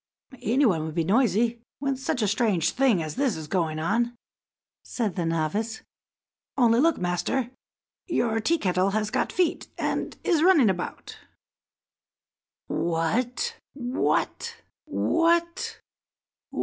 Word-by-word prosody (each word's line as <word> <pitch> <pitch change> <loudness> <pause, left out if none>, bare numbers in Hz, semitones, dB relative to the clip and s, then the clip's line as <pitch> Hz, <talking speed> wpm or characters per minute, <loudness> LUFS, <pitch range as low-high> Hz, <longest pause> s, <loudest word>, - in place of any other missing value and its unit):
"Any 260 +7 +2
one 170 -9 +2
would 160 0 -5
be 165 - +1
noisy 230 +3 +2 0.2
when 275 -1 -1
such 260 -2 -2
a - - +2
strange 205 -5 +2
thing 250 -11 +2
as 155 +6 -6
this 265 - +1
is 160 - -6
going 160 -2 0
on," 230 +9 0 0.7
said 220 -7 -2
the 170 -3 -1
novice. 165 +8 -1 0.7
"Only 235 -2 +4
look, 325 +2 +3
master, 180 +8 -1 0.6
your 235 - +1
Tea 330 +10 +2
kettle 185 - +1
has 210 0 -1
got - - 0
feet, 355 -3 0
and - - -2
is 330 -4 +2
running 320 - +6
about." 180 -1 -6 1.5
"What! 235 - -1 0.4
what! 340 - 0
230 Hz, 120 wpm, -26 LUFS, 180-270 Hz, 1.5 s, running